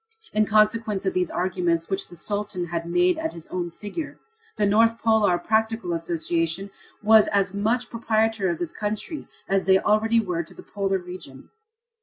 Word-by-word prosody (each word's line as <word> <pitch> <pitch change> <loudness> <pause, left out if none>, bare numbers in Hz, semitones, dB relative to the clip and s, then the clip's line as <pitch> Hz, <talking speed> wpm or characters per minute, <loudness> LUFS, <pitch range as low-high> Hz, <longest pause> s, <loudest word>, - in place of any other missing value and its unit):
In 215 0 +2
consequence 215 -1 +2
of 190 - +1
these 180 -1 0
arrangements, 175 -2 0
which 195 0 -2
the 175 - -13
Sultan 205 0 -2
had 170 0 -3
made 355 - +3
at 320 0 -3
his 165 -1 -10
own 175 -1 -2
figure, 210 - -6 0.4
the 210 - +1
North 225 +3 +4
Polar 220 -6 +3
Practical 220 0 0
Association 165 +2 -1 0.3
was 220 0 +6
as 200 -2 +1
much 225 +4 0
proprietor 220 -3 +1
of 170 - -1
this 175 -1 -4
country 215 +9 -4 0.2
as 195 -1 +1
they 190 0 +7
already 220 +3 +2
were 180 -6 -1
to 165 - -11
the - - -11
polar 195 -1 -1
region. 180 -7 -10
200 Hz, 170 wpm, -24 LUFS, 175-220 Hz, 0.4 s, they